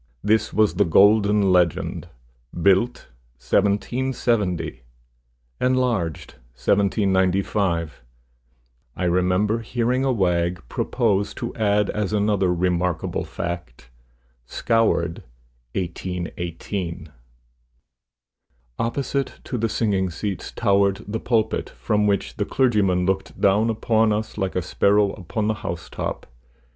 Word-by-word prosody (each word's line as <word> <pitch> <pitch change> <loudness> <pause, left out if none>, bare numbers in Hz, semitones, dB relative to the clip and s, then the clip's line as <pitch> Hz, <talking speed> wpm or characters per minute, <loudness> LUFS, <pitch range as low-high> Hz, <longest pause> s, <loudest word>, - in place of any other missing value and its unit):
This 110 +2 +2
was 110 -1 +3
the 100 - +3
golden 100 +2 +4
legend: 90 -3 +1 0.4
"BUILT, 95 - +1 0.3
1770. 100 - 0 0.8
ENLARGED, 125 - 0 0.2
1795." 95 - +1 0.9
I - - -4
remember 90 +5 +2
hearing 120 +3 -1
a 135 - +2
wag 90 -5 0
propose 100 - 0
to - - -5
add 105 -2 +1
as 105 -1 -2
another 100 -3 +2
remarkable 90 0 -1
fact, 70 -8 -6 0.6
"SCOURED, 110 -8 +1 0.5
1818." 85 -1 -4 1.7
Opposite 135 +3 -2
to - - -5
the 115 -1 0
singing 100 -4 0
seats 95 +3 -5
towered 100 -2 +1
the 110 +2 -3
pulpit, 115 -2 0
from 105 - 0
which 80 -11 -1
the - - 0
clergyman 100 -8 +2
looked 95 +1 -2
down 105 +3 +3
upon 110 0 +2
us 110 +1 -2
like 95 -3 -2
a 90 - 0
sparrow 100 +3 +2
upon 105 +3 -4
the 110 - +2
house 85 -6 -5
top. - - -4
100 Hz, 105 wpm, -23 LUFS, 90-110 Hz, 1.7 s, golden